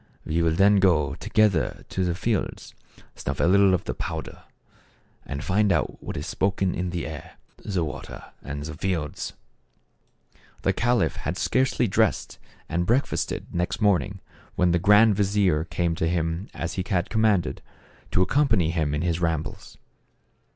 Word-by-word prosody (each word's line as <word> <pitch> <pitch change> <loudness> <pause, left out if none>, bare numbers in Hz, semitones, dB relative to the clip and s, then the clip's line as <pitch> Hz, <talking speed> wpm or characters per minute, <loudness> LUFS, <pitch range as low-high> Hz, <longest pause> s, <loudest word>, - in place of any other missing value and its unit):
We 80 +2 0
will 80 -1 +2
then 100 +3 +5
go 85 -8 +3
together 95 - +1
to 95 - -1
the 85 -2 0
fields, 105 +2 -2 0.4
snuff - - -5
a - - +2
little 95 +1 +5
of 90 - -3
the - - -3
pow - - -4
der, - - -13 0.8
and 70 +1 -4
find 100 +1 +2
out - - -1
what - - -6
is - - -4
spoken 95 -1 0
in 90 +1 -2
the 85 -1 -3
air, 80 +1 -8 0.3
the 95 -5 -1
water 75 - -8
and 70 +1 -6
the 80 +1 -6
fields." 80 -2 -3 1.3
The - - +2
caliph 120 0 +1
had - - -3
scarcely 130 -2 +1
dressed 110 -2 0 0.3
and 85 +2 -1
break 125 +5 +3
fasted, - - -4
next 90 0 -1
morning, 95 -2 +1 0.3
when 90 -1 +3
the 85 - +2
grand 105 +4 +6
vizier 95 -5 +2
came 85 -1 -1
to 80 - 0
him 85 +2 -1
as 85 0 -4
he 95 - -2
had 90 -2 0
commanded, 110 -5 +1 0.5
to 90 - +3
accompany 110 - +2
him 80 -4 0
in 75 - -1
his 85 -1 0
rambles. 80 -2 -3
90 Hz, 165 wpm, -25 LUFS, 80-100 Hz, 1.3 s, grand